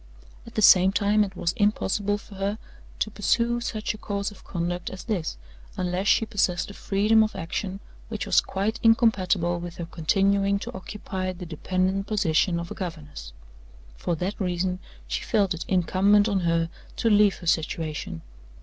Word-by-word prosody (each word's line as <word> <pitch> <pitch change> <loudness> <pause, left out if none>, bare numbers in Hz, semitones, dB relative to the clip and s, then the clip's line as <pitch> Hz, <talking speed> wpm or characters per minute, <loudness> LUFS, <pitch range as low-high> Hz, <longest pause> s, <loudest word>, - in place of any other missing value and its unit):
At - - -12
the 215 - +1
same 190 -1 +7
time 205 +1 +3
it 195 -2 -6
was 170 - 0
impossible 205 -1 +1
for 205 - -14
her 200 +2 -2 0.4
to 215 - -1
pursue 235 +3 +1
such 220 -2 -2
a 215 - -11
course 200 0 -3
of 205 - -15
conduct 175 0 -3
as 190 - -8
this, 185 - -2 0.4
unless 180 +2 -1
she 225 - +4
possessed 200 -4 0
a - - -11
freedom 210 +3 +3
of 215 - -3
action 185 +4 -4 0.3
which 220 -2 -3
was - - +4
quite 200 +4 -2
incompatible 190 -6 +3
with 175 -1 -7
her 170 - -5
continuing 195 +4 +1
to - - -7
occupy 190 -1 -5
the 180 0 -8
dependent 185 +4 -1
position 175 -4 +1
of 170 0 -6
a - - -2
governess. 150 - -7 0.6
For 170 - -2
that 185 +6 -3
reason 180 0 -1 0.3
she - - -2
felt 200 -3 +1
it 170 - -6
incumbent 195 +3 +3
on 200 -3 +1
her 165 -1 +1 0.2
to 230 - 0
leave 205 -1 +5
her 175 - -11
situation. 155 - -2
190 Hz, 170 wpm, -25 LUFS, 175-205 Hz, 0.6 s, same